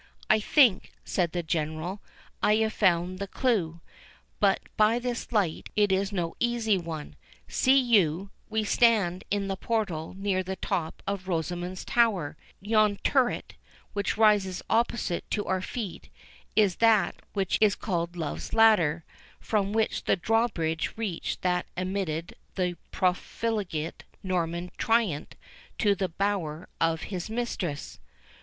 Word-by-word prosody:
"I 215 Hz, -, +5 dB
think," 235 Hz, -2 st, +4 dB
said 175 Hz, -3 st, 0 dB
the 175 Hz, -1 st, -2 dB
General, 160 Hz, +4 st, -2 dB, 0.4 s
"I 210 Hz, +1 st, +4 dB
have 220 Hz, 0 st, +1 dB
found 180 Hz, -1 st, +2 dB
the 200 Hz, -, -3 dB
clew, 190 Hz, -9 st, 0 dB, 0.6 s
but -, -, +3 dB
by 215 Hz, +1 st, +4 dB
this 245 Hz, -1 st, -4 dB
light 200 Hz, -8 st, 0 dB
it 205 Hz, -1 st, +3 dB
is 195 Hz, +1 st, +1 dB
no 175 Hz, -4 st, -2 dB
easy 235 Hz, -3 st, +2 dB
one! 165 Hz, -4 st, -5 dB, 0.3 s
See 270 Hz, +1 st, +4 dB
you, 195 Hz, -, +2 dB, 0.2 s
we 220 Hz, 0 st, 0 dB
stand 205 Hz, -5 st, +3 dB
in 200 Hz, -1 st, 0 dB
the 195 Hz, -, -1 dB
portal 190 Hz, -7 st, -2 dB
near 195 Hz, -1 st, 0 dB
the 190 Hz, +1 st, -4 dB
top 175 Hz, -5 st, -3 dB
of 195 Hz, -2 st, -3 dB
Rosamond's 175 Hz, +1 st, -3 dB
Tower; 210 Hz, -12 st, +2 dB, 0.3 s
and 200 Hz, -, -13 dB
yon 215 Hz, -2 st, +4 dB
turret, 260 Hz, -3 st, +1 dB, 0.4 s
which 200 Hz, 0 st, -1 dB
rises 205 Hz, -4 st, +3 dB
opposite 225 Hz, -6 st, 0 dB
to 205 Hz, -, -1 dB
our 185 Hz, -1 st, 0 dB
feet, 205 Hz, -1 st, -6 dB, 0.5 s
is 200 Hz, -4 st, +3 dB
that 220 Hz, -5 st, +4 dB, 0.2 s
which 195 Hz, -3 st, 0 dB
is 210 Hz, -2 st, +5 dB
called 175 Hz, -3 st, -2 dB
Love's 160 Hz, -4 st, -4 dB
Ladder, 175 Hz, -8 st, +5 dB, 0.4 s
from 205 Hz, -2 st, 0 dB
which 220 Hz, +1 st, 0 dB
the -, -, +3 dB
drawbridge 180 Hz, -6 st, 0 dB
reached 210 Hz, -7 st, -3 dB
that 180 Hz, 0 st, +1 dB
admitted 185 Hz, -3 st, -2 dB, 0.2 s
the 180 Hz, -2 st, 0 dB
profligate 185 Hz, -2 st, -2 dB, 0.2 s
Norman 175 Hz, -1 st, -2 dB
tyrant 225 Hz, -10 st, +1 dB, 0.4 s
to 205 Hz, -2 st, +3 dB
the 190 Hz, -1 st, -2 dB
bower 180 Hz, -3 st, -2 dB
of 165 Hz, 0 st, +1 dB
his 180 Hz, +2 st, -4 dB
mistress." 215 Hz, -10 st, -3 dB
195 Hz, 135 wpm, -28 LUFS, 175-215 Hz, 0.6 s, I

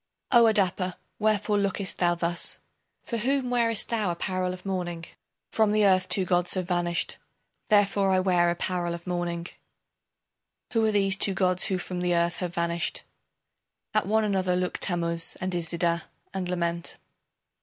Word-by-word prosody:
O 240 Hz, -3 st, +7 dB
Adapa, 185 Hz, -4 st, +1 dB, 0.2 s
wherefore 210 Hz, -1 st, +1 dB
lookest 200 Hz, -1 st, -1 dB
thou 175 Hz, -1 st, +3 dB
thus, 170 Hz, 0 st, -1 dB, 0.5 s
For 235 Hz, -, -3 dB
whom 255 Hz, +2 st, 0 dB
wearest 230 Hz, -3 st, +1 dB
thou 220 Hz, -5 st, 0 dB
apparel 185 Hz, +1 st, -2 dB
of 185 Hz, +1 st, -9 dB
mourning? 175 Hz, -3 st, -3 dB, 0.5 s
From 220 Hz, -1 st, +3 dB
the 210 Hz, 0 st, +3 dB
earth 185 Hz, -1 st, +3 dB
two 190 Hz, -, +2 dB
gods 180 Hz, 0 st, +2 dB
have 185 Hz, -2 st, -2 dB
vanished 175 Hz, -1 st, -1 dB, 0.5 s
Therefore 200 Hz, -2 st, +3 dB
I 190 Hz, -1 st, +3 dB
wear 180 Hz, -2 st, +3 dB
apparel 175 Hz, 0 st, -1 dB
of 170 Hz, -, -11 dB
mourning. 175 Hz, -1 st, -3 dB, 1.3 s
Who 225 Hz, -1 st, +2 dB
are 220 Hz, -, +2 dB
these 195 Hz, -2 st, +2 dB
two 195 Hz, -1 st, +2 dB
gods 185 Hz, 0 st, +2 dB
who 190 Hz, -, 0 dB
from 180 Hz, 0 st, -5 dB
the 175 Hz, -1 st, +1 dB
earth 170 Hz, 0 st, +1 dB
have 175 Hz, -2 st, -4 dB
vanished? 170 Hz, 0 st, -1 dB, 0.9 s
At 215 Hz, -3 st, +1 dB
one 220 Hz, +1 st, +2 dB
another 190 Hz, -3 st, +1 dB
look 180 Hz, 0 st, -2 dB
Tammuz 170 Hz, -2 st, 0 dB
and 185 Hz, 0 st, -2 dB
Iszida 170 Hz, 0 st, 0 dB, 0.3 s
and 185 Hz, -2 st, -3 dB
lament. 170 Hz, -1 st, -2 dB
185 Hz, 155 wpm, -26 LUFS, 175-200 Hz, 1.3 s, O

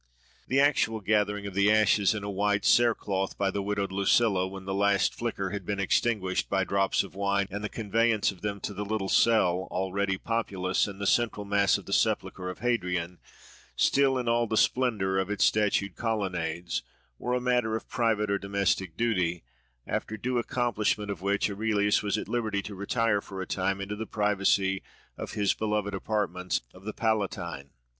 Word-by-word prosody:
The 135 Hz, -, +2 dB
actual 135 Hz, -6 st, +3 dB
gathering 105 Hz, -1 st, 0 dB
of 100 Hz, -, -5 dB
the 100 Hz, +2 st, +3 dB
ashes 110 Hz, -1 st, +4 dB
in 105 Hz, -, -4 dB
a 100 Hz, -, -4 dB
white 100 Hz, 0 st, 0 dB
cere 120 Hz, -2 st, +5 dB
cloth 95 Hz, -1 st, -3 dB
by 100 Hz, -1 st, +1 dB
the 100 Hz, -, -2 dB
widowed 100 Hz, -1 st, -2 dB
Lucilla, 100 Hz, 0 st, +2 dB
when 95 Hz, 0 st, -9 dB
the 95 Hz, -, -3 dB
last 100 Hz, 0 st, +2 dB
flicker 100 Hz, -5 st, -3 dB
had 100 Hz, -1 st, -4 dB
been 100 Hz, +2 st, -3 dB
extinguished 100 Hz, -1 st, 0 dB
by 95 Hz, -1 st, +1 dB
drops 95 Hz, +1 st, +1 dB
of 100 Hz, -, -11 dB
wine; 100 Hz, 0 st, 0 dB
and 105 Hz, +2 st, -5 dB
the 105 Hz, -, -2 dB
conveyance 115 Hz, 0 st, +1 dB
of 95 Hz, -, -15 dB
them 100 Hz, -1 st, -3 dB
to 105 Hz, -, -4 dB
the 100 Hz, +1 st, -4 dB
little 105 Hz, -2 st, -2 dB
cell, 95 Hz, -6 st, +3 dB
already 95 Hz, +1 st, -1 dB
populous, 95 Hz, -5 st, -1 dB
in 100 Hz, -1 st, -8 dB
the 100 Hz, -, -4 dB
central 110 Hz, -1 st, +1 dB
mass 100 Hz, -1 st, +3 dB
of -, -, -11 dB
the -, -, -4 dB
sepulchre 90 Hz, 0 st, 0 dB
of 90 Hz, -, -8 dB
Hadrian, 90 Hz, -7 st, -1 dB, 0.6 s
still 135 Hz, -1 st, +3 dB
in 125 Hz, -2 st, -3 dB
all 115 Hz, 0 st, +2 dB
the 110 Hz, -, -1 dB
splendour 105 Hz, -8 st, +2 dB
of 95 Hz, 0 st, -2 dB
its 105 Hz, -, +2 dB
statued 100 Hz, -3 st, +1 dB
colonnades, 90 Hz, -7 st, -2 dB, 0.4 s
were 125 Hz, 0 st, -1 dB
a -, -, +1 dB
matter 125 Hz, -3 st, +1 dB
of 110 Hz, -, -5 dB
private 110 Hz, -3 st, 0 dB
or 100 Hz, -, +1 dB
domestic 100 Hz, -3 st, -1 dB
duty; 90 Hz, -, 0 dB, 0.4 s
after 110 Hz, -, -3 dB
the 105 Hz, -, -13 dB
due 125 Hz, 0 st, +1 dB
accomplishment 110 Hz, -4 st, -1 dB
of 95 Hz, -4 st, -6 dB
which 100 Hz, +1 st, +1 dB
Aurelius 105 Hz, 0 st, +1 dB
was 105 Hz, -1 st, -1 dB
at -, -, -5 dB
liberty 110 Hz, -5 st, -1 dB
to 105 Hz, -, -7 dB
retire 105 Hz, +2 st, 0 dB
for 95 Hz, -1 st, -8 dB
a 95 Hz, -, -3 dB
time 95 Hz, +1 st, -1 dB
into 100 Hz, +1 st, -4 dB
the 110 Hz, +1 st, -5 dB
privacy 100 Hz, -2 st, +1 dB, 0.3 s
of -, -, -7 dB
his 100 Hz, -1 st, +2 dB
beloved 105 Hz, -2 st, -2 dB
apartments 95 Hz, -2 st, -1 dB
of 95 Hz, +1 st, -16 dB
the 110 Hz, -, -4 dB
Palatine. 95 Hz, -10 st, -2 dB
100 Hz, 190 wpm, -28 LUFS, 95-110 Hz, 0.6 s, cere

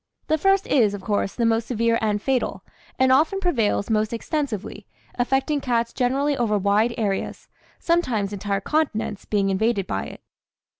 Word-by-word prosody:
The 315 Hz, 0 st, +1 dB
first 390 Hz, +3 st, +3 dB
is, 215 Hz, -7 st, +2 dB
of 195 Hz, -, -9 dB
course, 205 Hz, -2 st, -1 dB
the 235 Hz, -, 0 dB
most 225 Hz, 0 st, +1 dB
severe 230 Hz, -1 st, +1 dB
and 210 Hz, -1 st, 0 dB
fatal, 260 Hz, +3 st, -1 dB, 0.3 s
and 260 Hz, 0 st, +3 dB
often 310 Hz, +9 st, +3 dB
prevails 230 Hz, -, 0 dB
most 215 Hz, +1 st, +1 dB
extensively, 235 Hz, -, -4 dB, 0.3 s
affecting 270 Hz, +4 st, 0 dB
cats 235 Hz, -3 st, 0 dB
generally 275 Hz, +3 st, +1 dB
over 230 Hz, -5 st, +1 dB
wide 205 Hz, +4 st, +2 dB
areas, 200 Hz, -3 st, -2 dB, 0.3 s
sometimes 245 Hz, -, 0 dB
entire 200 Hz, 0 st, -2 dB
continents 225 Hz, -8 st, -1 dB
being 200 Hz, -2 st, +1 dB
invaded 205 Hz, 0 st, +1 dB
by 95 Hz, -, -3 dB
it. -, -, -10 dB
230 Hz, 155 wpm, -23 LUFS, 205-270 Hz, 0.3 s, first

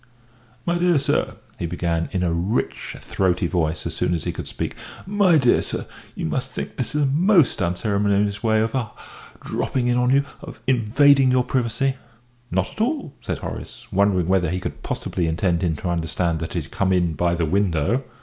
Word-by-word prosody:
"My 175 Hz, 0 st, +1 dB
dear 175 Hz, -2 st, +4 dB
sir," 145 Hz, +1 st, 0 dB, 0.2 s
he 85 Hz, -, -2 dB
began, 85 Hz, -1 st, -1 dB
in 95 Hz, -3 st, -1 dB
a 85 Hz, -2 st, +1 dB
rich, 90 Hz, +8 st, -2 dB
throaty 90 Hz, -1 st, 0 dB
voice, 85 Hz, -2 st, -1 dB
as -, -, -3 dB
soon 90 Hz, -, +1 dB
as 80 Hz, -, -3 dB
he -, -, -1 dB
could -, -, -6 dB
speak; -, -, -4 dB, 0.3 s
"my 195 Hz, -3 st, +4 dB
dear 125 Hz, -4 st, +4 dB
sir, -, -, -3 dB, 0.3 s
you -, -, -3 dB
must 130 Hz, +11 st, -2 dB
think -, -, -6 dB
this 130 Hz, +3 st, -3 dB
is 150 Hz, -, +2 dB
a -, -, +4 dB
most 165 Hz, -, +3 dB
unceremonious 100 Hz, +2 st, +1 dB
way 110 Hz, -1 st, +3 dB
of 110 Hz, 0 st, -1 dB
ah! 120 Hz, -5 st, -2 dB, 0.5 s
dropping 125 Hz, -2 st, -1 dB
in 120 Hz, 0 st, +2 dB
on 125 Hz, 0 st, +2 dB
you 140 Hz, +2 st, +4 dB, 0.2 s
of -, -, -10 dB
invading 130 Hz, +3 st, +4 dB
your 125 Hz, 0 st, +3 dB
privacy." 130 Hz, +2 st, 0 dB, 0.5 s
"Not 95 Hz, -1 st, 0 dB
at -, -, -6 dB
all," 265 Hz, -, -1 dB
said -, -, -3 dB
Horace, -, -, -7 dB
wondering 95 Hz, -3 st, +2 dB
whether 95 Hz, -3 st, +2 dB
he 90 Hz, +2 st, -1 dB
could -, -, -6 dB
possibly 85 Hz, -2 st, -2 dB
intend 85 Hz, +1 st, +1 dB
him 85 Hz, -4 st, +1 dB
to 90 Hz, +4 st, -4 dB
understand 85 Hz, 0 st, -1 dB
that 80 Hz, +1 st, -5 dB
he 85 Hz, -, -1 dB
had 80 Hz, -, -15 dB
come 95 Hz, -1 st, 0 dB
in 90 Hz, -3 st, +2 dB
by 85 Hz, +3 st, +1 dB
the 85 Hz, -1 st, 0 dB
window. 95 Hz, -, +1 dB
100 Hz, 200 wpm, -23 LUFS, 85-130 Hz, 0.5 s, dear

